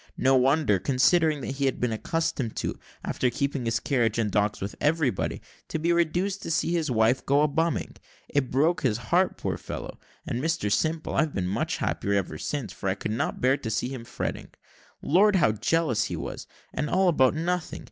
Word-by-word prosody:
No 135 +1 +4
wonder, 130 -5 +3
considering 150 - +3
what - - -4
he 140 - 0
had 135 - 0
been 125 -2 0
accustomed 130 -1 -2
to, - - -3 0.3
after 125 - 0
keeping 140 +1 -2
his 115 -1 +1
carriage 120 -6 +1
and 110 -3 0
dogs 105 +1 +1
with 100 +1 -5
everybody, 150 - 0 0.2
to - - -3
be 170 +2 +1
reduced 175 +4 0
to - - -6
see 165 +1 +1
his 165 -3 0
wife 115 +2 +2
go 140 +2 +3
a - - +4
bumming. 160 +3 -1 0.3
It 140 -3 0
broke 155 +7 +2
his 115 -5 +1
heart, 170 +11 +1
poor - - -3
fellow! - - -7 0.3
and, 120 - -2
Mr 160 -9 0
Simple, 155 +8 0
I've 155 +1 +1
been 95 - -1
much 95 - -1
happier 100 - -1
ever 90 -6 -1
since, 145 -5 -3
for 95 - -3
I 95 - 0
could 105 - -4
not 110 - -2
bear 130 +2 +3
to 125 -5 -5
see 110 +3 -1
him 130 -3 -6
fretting. 120 - -4 0.6
Lord, 200 +7 +4
how 170 - +4
jealous 120 +2 +1
he - - -4
was - - -6 0.3
and 150 - -2
all 190 0 +3
about 140 -5 +4
nothing! 180 +2 -2
135 Hz, 200 wpm, -26 LUFS, 115-165 Hz, 0.6 s, No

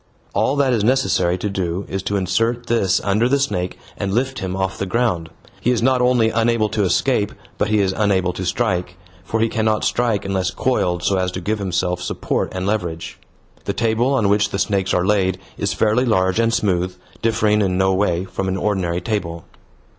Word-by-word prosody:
All 110 +7 +1
that 140 -3 +2
is 110 -4 +1
necessary 105 -8 +2
to 100 - -3
do 95 -1 -2
is 95 - -3
to 100 +2 -2
insert 115 +6 0
this 95 -6 +2
under 105 +5 +2
the 140 - +3
snake 90 -10 -2 0.2
and 100 - -3
lift 130 +5 0
him 95 -1 -3
off 95 0 -2
the 95 - -2
ground. 95 -7 0 0.3
He - - 0
is 120 -2 +1
not 130 0 +3
only 125 -3 +3
unable 115 -1 +2
to 110 0 -1
escape, 105 +2 +1 0.3
but - - +2
he 105 -1 +2
is 95 -1 +1
unable 95 -4 +1
to 95 - -5
strike, 90 -4 -1 0.3
for 115 - -2
he 115 - +3
cannot 110 -1 0
strike 115 -5 0
unless 95 -2 0
coiled 95 -9 0
so 95 +2 +2
as 90 0 0
to 95 - -3
give 105 +4 -2
himself 90 -2 -1
support 90 - -2
and 95 0 -2
leverage. 90 -6 -3 0.5
The - - -1
table 120 +4 +1
on 110 -6 +2
which 100 0 +2
the - - -3
snakes 95 -1 0
are 90 0 +2
laid 95 -2 +2 0.2
is 100 0 -2
fairly 110 +3 +2
large 95 -3 +2
and 115 0 +3
smooth, 90 -4 0 0.3
differing 110 -2 +2
in 95 -2 +1
no 95 0 +3
way 95 -2 +1
from 95 0 -4
an 95 0 -1
ordinary 95 -4 -1
table. 85 -5 -3
100 Hz, 200 wpm, -20 LUFS, 95-115 Hz, 0.5 s, the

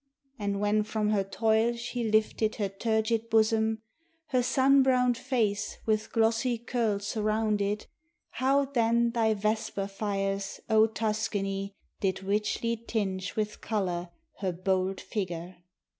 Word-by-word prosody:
And 200 -1 -1
when 210 +1 +2
from 210 0 -1
her 200 -2 +2
toil 220 +3 +1
she 240 +1 -4
lifted 215 0 +1
her 205 -2 -1
turgid 220 +2 0
bosom, 220 0 +2 0.5
her 255 -3 +2
sun 270 +2 +4
browned 250 -2 +3
face 215 -5 -1
with 215 -1 0
glossy 230 +2 +2
curls 225 -4 -1
surrounded, 215 -1 0 0.5
how 275 +2 +2
then 235 -3 +2
thy 225 -2 +2
vesper 210 -1 -1
fires, 195 -1 -2
O 220 0 +6
Tuscany, 205 -3 -2 0.2
did 190 -1 -1
richly 210 +3 0
tinge 200 -5 -3
with 210 -1 -2
color 180 -5 -2 0.3
her 190 -2 0
bold 185 +1 0
figure! 180 -4 -4
215 Hz, 125 wpm, -29 LUFS, 200-230 Hz, 0.5 s, O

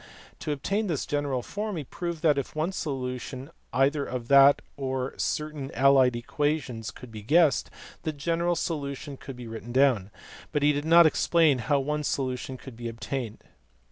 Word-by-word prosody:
To 150 - -3
obtain 200 +9 -1
this 160 -6 -1
general 145 -4 -1
form 210 - -4
he 155 - -3
proved 170 +3 -5
that, 150 -3 +4
if 140 - -6
one 155 +4 0
solution 130 -3 -4 0.2
either 140 +3 +2
of 125 -3 -5
that 140 0 +7
or 130 -1 -2
of - - -7
certain 150 -3 -2
allied 130 -2 +5
equations 125 -3 -2
could 125 +3 -11
be 110 -1 -8
guessed, 150 +4 +3 0.3
the 155 - -2
general 170 +4 0
solution 145 -3 -4
could 135 0 -9
be 125 0 -9
written 115 +1 -7
down; 125 -7 +3 0.4
but 150 -2 0
he 150 0 +5
did 145 +1 -2
not 170 +1 +7
explain 155 -3 +3
how 140 +5 +1
one 150 +2 -2
solution 130 -2 -2
could 130 -1 -11
be 120 0 -6
obtained. 115 0 -5
140 Hz, 170 wpm, -27 LUFS, 125-155 Hz, 0.4 s, that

